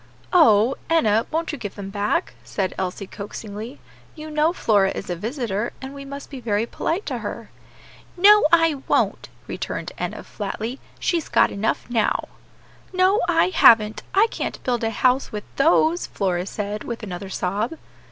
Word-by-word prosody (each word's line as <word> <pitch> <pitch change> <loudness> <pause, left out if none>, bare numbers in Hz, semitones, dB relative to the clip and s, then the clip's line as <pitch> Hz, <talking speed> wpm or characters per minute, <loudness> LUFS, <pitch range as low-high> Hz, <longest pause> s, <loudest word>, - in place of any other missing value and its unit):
"Oh! 235 - +5
Enna, 225 -9 +3
won't 330 +1 -1
you 290 - -6
give 205 -4 -6
them 195 -1 -7
back?" 205 +1 -1
said 190 -2 -2
Elsie, 190 +1 -3
coaxingly; 210 +5 -8 0.4
"you 310 -1 -8
know 305 +2 +2
Flora 205 - +2
is 195 - -5
a - - -1
visitor, 225 - -3
and 265 +1 -8
we 280 0 -9
must 280 +1 -8
be 270 - -6
very 220 -2 0
polite 335 - -2
to - - -3
her." - - -6 0.7
"No, 415 -1 +7
I 330 -4 +4
won't," - - +1 0.2
returned - - -5
Enna, - - -4
flatly; 220 +5 -5 0.2
"she's 335 -3 -1
got - - +4
enough 205 +3 -1
now." 230 -3 0 0.6
"No, 370 +2 +3
I 330 +1 +3
haven't; 220 -10 +5
I 405 +3 +6
can't - - -4
build 245 -2 -1
a 225 - +1
house 255 +4 +1
with 210 -1 -5
those," 320 +3 +3
Flora 185 -2 -1
said, 210 0 -4
with 235 -1 -6
another 190 -1 -6
sob. 205 - -2
230 Hz, 160 wpm, -23 LUFS, 205-305 Hz, 0.7 s, No